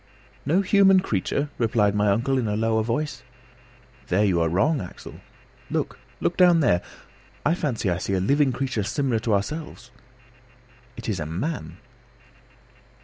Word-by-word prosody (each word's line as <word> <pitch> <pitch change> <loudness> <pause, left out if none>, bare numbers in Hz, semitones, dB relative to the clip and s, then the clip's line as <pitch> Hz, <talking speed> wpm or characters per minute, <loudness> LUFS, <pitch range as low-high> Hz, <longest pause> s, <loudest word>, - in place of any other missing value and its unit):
"No 175 +7 +3
human 195 -1 +5
creature?" 140 - -2
replied 110 -3 +2
my 105 0 +1
uncle 120 +7 +1
in 120 - -1
a 105 - -1
lower 110 0 +1
voice. 130 +5 -2 0.9
"You 90 -2 +2
are 80 - +2
wrong, 135 - +1
Axel. 90 - -10 0.5
Look, - - -3 0.2
look 170 - -1
down 180 -2 +6
there! 90 - +3 0.6
I 150 - +3
fancy 140 - -2
I 90 -1 0
see 100 - -3
a 95 - +1
living 140 +8 +2
creature 130 -3 -2
similar 120 +2 -1
to 110 -1 +1
ourselves: 125 +2 -5 1.1
it - - -7
is 105 -6 -1
a 75 - -4
man!" 85 - -4
115 Hz, 145 wpm, -24 LUFS, 100-150 Hz, 1.1 s, down